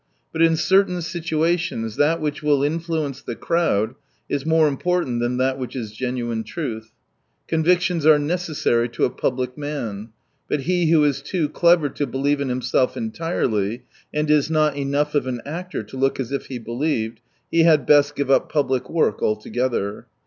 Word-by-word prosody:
But 165 Hz, -, -1 dB
in 165 Hz, -1 st, +5 dB
certain 185 Hz, +2 st, +3 dB
situations 165 Hz, -, -1 dB
that 160 Hz, +3 st, +3 dB
which 150 Hz, -2 st, -3 dB
will 145 Hz, -2 st, +2 dB
influence 155 Hz, -2 st, -2 dB
the 120 Hz, -, -6 dB
crowd 130 Hz, -11 st, 0 dB, 0.3 s
is 145 Hz, +1 st, -3 dB
more 160 Hz, -1 st, +4 dB
important 145 Hz, -3 st, 0 dB
than 120 Hz, +1 st, 0 dB
that 130 Hz, +1 st, 0 dB
which 125 Hz, -1 st, -5 dB
is 115 Hz, -5 st, -4 dB
genuine 120 Hz, -1 st, -3 dB
truth. 110 Hz, -3 st, -5 dB, 0.6 s
Convictions 175 Hz, +1 st, +2 dB
are 155 Hz, 0 st, +7 dB
necessary 145 Hz, -7 st, 0 dB
to 120 Hz, -, 0 dB
a -, -, -1 dB
public 125 Hz, +1 st, -2 dB
man; 120 Hz, -8 st, -4 dB, 0.4 s
but 150 Hz, -, 0 dB
he 175 Hz, +2 st, +1 dB
who 160 Hz, -2 st, +5 dB
is 140 Hz, -2 st, +1 dB
too 155 Hz, +2 st, -1 dB
clever 170 Hz, -1 st, +4 dB
to 145 Hz, +1 st, -3 dB
believe 140 Hz, +3 st, 0 dB
in 140 Hz, -, -1 dB
himself 125 Hz, 0 st, 0 dB
entirely, 125 Hz, -, -2 dB, 0.3 s
and 150 Hz, 0 st, 0 dB
is 150 Hz, 0 st, +3 dB
not 155 Hz, -2 st, +2 dB
enough 145 Hz, +1 st, -1 dB
of 145 Hz, -3 st, +1 dB
an 125 Hz, -2 st, -2 dB
actor 175 Hz, -2 st, -5 dB
to 105 Hz, +6 st, -10 dB
look 135 Hz, +1 st, +1 dB
as 130 Hz, -1 st, -3 dB
if 140 Hz, -, -3 dB
he 130 Hz, -, -5 dB
believed, 115 Hz, -1 st, -2 dB, 0.3 s
he 165 Hz, -, +4 dB
had 155 Hz, -5 st, +4 dB
best 145 Hz, 0 st, +4 dB
give 140 Hz, -1 st, -1 dB
up -, -, +3 dB
public 135 Hz, -4 st, 0 dB
work 160 Hz, -10 st, +1 dB
altogether. 110 Hz, -1 st, -1 dB
145 Hz, 170 wpm, -22 LUFS, 125-160 Hz, 0.6 s, are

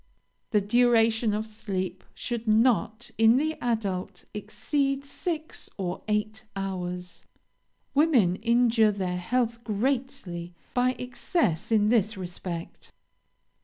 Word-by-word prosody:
"The 210 Hz, -3 st, +3 dB
duration 225 Hz, 0 st, +3 dB
of 210 Hz, +1 st, -1 dB
sleep 190 Hz, -4 st, -4 dB
should 235 Hz, -2 st, -4 dB
not, 220 Hz, 0 st, +2 dB
in 225 Hz, +2 st, +6 dB
the 310 Hz, +3 st, +1 dB
adult, 200 Hz, -5 st, -2 dB
exceed 275 Hz, +6 st, -1 dB
six 315 Hz, +2 st, -4 dB
or 185 Hz, -2 st, -3 dB
eight 215 Hz, +1 st, -1 dB
hours; 180 Hz, -2 st, -4 dB, 0.7 s
women 260 Hz, -, +4 dB
injure 230 Hz, -1 st, +4 dB
their 185 Hz, -3 st, -2 dB
health 235 Hz, +4 st, -1 dB
greatly 210 Hz, -7 st, -2 dB, 0.2 s
by 250 Hz, +1 st, +3 dB
excess 245 Hz, -, -1 dB
in 210 Hz, -1 st, +4 dB
this 220 Hz, -2 st, +2 dB
respect. 175 Hz, -2 st, -6 dB
220 Hz, 105 wpm, -27 LUFS, 190-245 Hz, 0.7 s, in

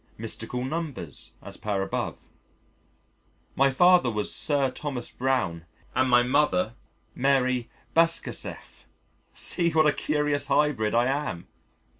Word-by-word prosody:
Mystical 115 Hz, +2 st, -4 dB
numbers 135 Hz, -, -5 dB
(as -, -, -8 dB
per 100 Hz, -2 st, -2 dB
above). 95 Hz, -, -5 dB, 1.2 s
My 135 Hz, +1 st, +4 dB
father 175 Hz, 0 st, +5 dB
was 105 Hz, -2 st, 0 dB
Sir 140 Hz, -3 st, +1 dB
Thomas 130 Hz, -3 st, -5 dB
Browne 120 Hz, -11 st, -1 dB, 0.3 s
and 130 Hz, 0 st, +2 dB
my 120 Hz, 0 st, +5 dB
mother 125 Hz, -6 st, +2 dB, 0.4 s
Marie 130 Hz, -2 st, +1 dB, 0.3 s
Bashkirtseff. 165 Hz, 0 st, -1 dB, 0.5 s
See 170 Hz, -2 st, +1 dB
what 160 Hz, -1 st, +3 dB
a 150 Hz, -, +4 dB
curious 150 Hz, -2 st, 0 dB
hybrid 140 Hz, -7 st, +1 dB
I 120 Hz, +1 st, +4 dB
am! 135 Hz, -10 st, -3 dB
130 Hz, 115 wpm, -26 LUFS, 115-150 Hz, 1.2 s, father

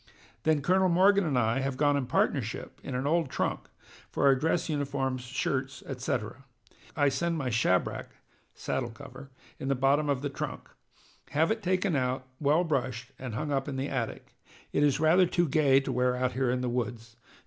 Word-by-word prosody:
Then 155 Hz, -3 st, +2 dB
Colonel 185 Hz, +3 st, +3 dB
Morgan 195 Hz, +3 st, +5 dB
and 140 Hz, -4 st, 0 dB
I 115 Hz, +1 st, +2 dB
have 135 Hz, -1 st, -2 dB
gone 145 Hz, 0 st, +3 dB
in 135 Hz, -3 st, -1 dB
partnership -, -, -1 dB
in 130 Hz, -, -5 dB
an 130 Hz, +2 st, -2 dB
old 160 Hz, 0 st, +1 dB
trunk, -, -, -2 dB, 0.4 s
for -, -, 0 dB
our 140 Hz, -, +7 dB
dress 160 Hz, +5 st, 0 dB
uniforms, 140 Hz, -4 st, -2 dB
shirts, 130 Hz, +1 st, -3 dB
etc. 125 Hz, -2 st, -3 dB, 0.5 s
I 145 Hz, -2 st, +3 dB
send 170 Hz, +4 st, -1 dB
my 130 Hz, -5 st, -2 dB
shabrack 100 Hz, -5 st, +1 dB, 0.5 s
[saddle 120 Hz, -2 st, -2 dB
cover] 130 Hz, +4 st, -11 dB, 0.3 s
in 135 Hz, -, -4 dB
the 135 Hz, -, +2 dB
bottom 140 Hz, +3 st, +2 dB
of 140 Hz, -1 st, 0 dB
the 145 Hz, -, -1 dB
trunk. -, -, -6 dB, 0.6 s
Have 160 Hz, +7 st, +2 dB
it 220 Hz, 0 st, -1 dB
taken 185 Hz, -1 st, +1 dB
out, 130 Hz, -1 st, -1 dB
well 150 Hz, +4 st, +3 dB
brushed, 130 Hz, -5 st, -2 dB
and 125 Hz, -4 st, -5 dB
hung 150 Hz, +4 st, -3 dB
up 135 Hz, 0 st, 0 dB
in 140 Hz, -, -4 dB
the 135 Hz, +2 st, -2 dB
attic. 125 Hz, -5 st, -4 dB, 0.4 s
It -, -, +2 dB
is 145 Hz, -2 st, +3 dB
rather 170 Hz, +4 st, +5 dB
too 175 Hz, 0 st, +1 dB
gay 140 Hz, -2 st, +4 dB
to 135 Hz, -, -3 dB
wear 125 Hz, 0 st, +1 dB
out 125 Hz, 0 st, 0 dB
here 130 Hz, -1 st, 0 dB
in 125 Hz, +1 st, 0 dB
the 125 Hz, -, -1 dB
woods. 120 Hz, -1 st, -4 dB
135 Hz, 190 wpm, -29 LUFS, 125-155 Hz, 0.6 s, our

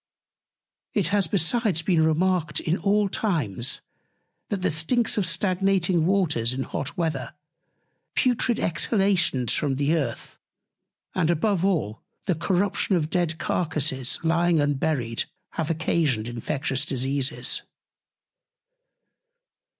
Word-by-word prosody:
It 190 Hz, -6 st, +2 dB
has 200 Hz, -3 st, +1 dB
besides 185 Hz, 0 st, +1 dB
been 170 Hz, -4 st, +3 dB
remarked 160 Hz, 0 st, +1 dB
in 165 Hz, -, 0 dB
all 205 Hz, 0 st, +2 dB
Times, 145 Hz, -, -1 dB, 0.7 s
that 195 Hz, -3 st, -2 dB
the -, -, +2 dB
Stinks 220 Hz, +10 st, +1 dB
of 200 Hz, -5 st, 0 dB
stagnating 185 Hz, -1 st, +1 dB
Waters 160 Hz, -12 st, +1 dB
in 135 Hz, +1 st, -2 dB
hot 145 Hz, +8 st, -5 dB
Weather, 160 Hz, -7 st, -2 dB, 0.8 s
putrid 245 Hz, -2 st, +2 dB
Exhalations 175 Hz, -, +2 dB
from 140 Hz, -3 st, 0 dB
the 145 Hz, +3 st, +1 dB
Earth; 155 Hz, -4 st, -3 dB, 0.7 s
and 170 Hz, -3 st, +1 dB
above 180 Hz, +2 st, +1 dB
all, 135 Hz, -, 0 dB, 0.2 s
the 190 Hz, -, +2 dB
Corruption 190 Hz, +4 st, 0 dB
of 160 Hz, -2 st, -1 dB
dead 170 Hz, -3 st, 0 dB
Carcasses 150 Hz, -8 st, -1 dB
lying 170 Hz, 0 st, +3 dB
unburied, 145 Hz, -5 st, 0 dB, 0.3 s
have 160 Hz, -2 st, -3 dB
occasioned 155 Hz, -8 st, 0 dB
infectious 135 Hz, +3 st, -2 dB
Diseases. 135 Hz, 0 st, 0 dB
165 Hz, 110 wpm, -25 LUFS, 145-190 Hz, 0.8 s, been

